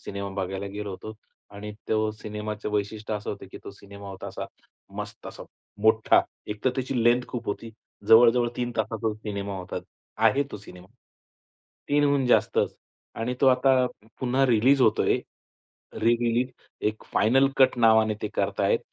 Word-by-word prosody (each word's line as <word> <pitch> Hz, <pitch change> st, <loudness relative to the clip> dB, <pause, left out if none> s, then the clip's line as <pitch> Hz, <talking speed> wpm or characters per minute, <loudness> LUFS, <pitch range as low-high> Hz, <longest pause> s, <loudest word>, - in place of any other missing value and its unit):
Cinema 100 Hz, 0 st, -5 dB
बघायला 95 Hz, 0 st, -3 dB
गेलो 105 Hz, 0 st, -4 dB
होतो 105 Hz, +3 st, -7 dB, 0.4 s
आणि 105 Hz, +1 st, -7 dB, 0.2 s
तो 110 Hz, 0 st, +1 dB
सिनेमाचं 105 Hz, 0 st, -5 dB
वैशिष्ट्य 105 Hz, +1 st, -2 dB
असं 105 Hz, -1 st, -4 dB
होतं, 100 Hz, -, -7 dB
की -, -, -8 dB
तो -, -, -7 dB
सिनेमा 100 Hz, 0 st, -12 dB
होता 95 Hz, -1 st, -8 dB
असा -, -, -6 dB, 0.5 s
मस्त -, -, -7 dB
असा -, -, -9 dB, 0.4 s
मोठा, 110 Hz, 0 st, +5 dB, 0.3 s
एकतर 105 Hz, +5 st, -1 dB
त्याची 130 Hz, -2 st, -1 dB
लेंग्थ 120 Hz, +1 st, +3 dB
खूप 120 Hz, -1 st, -5 dB
होती. 115 Hz, +3 st, -4 dB, 0.4 s
जवळजवळ 120 Hz, +1 st, +6 dB
3 120 Hz, -1 st, -2 dB
तासाचा 110 Hz, 0 st, -1 dB
सिनेमा 100 Hz, -2 st, -5 dB
होता, 90 Hz, 0 st, -6 dB, 0.4 s
आहे 140 Hz, -, +3 dB
तो -, -, -4 dB
सिनेमा. 90 Hz, -3 st, -13 dB, 1.0 s
3हून 145 Hz, -2 st, +2 dB
जास्तच 125 Hz, -, +2 dB, 0.5 s
आणि 120 Hz, +2 st, -1 dB
तो 135 Hz, -, +4 dB
आता 130 Hz, 0 st, +4 dB, 0.3 s
पुन्हा 130 Hz, +1 st, +2 dB
रिलीज 125 Hz, +3 st, +4 dB
होतोय. 110 Hz, -, +3 dB, 0.8 s
रि-रिलीज 120 Hz, +2 st, +1 dB, 0.4 s
एक 110 Hz, -, -16 dB
फायनल 135 Hz, +5 st, +4 dB
कट 130 Hz, -1 st, +5 dB
नावाने 110 Hz, -2 st, +4 dB
ते 105 Hz, -, -1 dB
करतायत, -, -, +1 dB
110 Hz, 145 wpm, -26 LUFS, 105-125 Hz, 1.0 s, जवळजवळ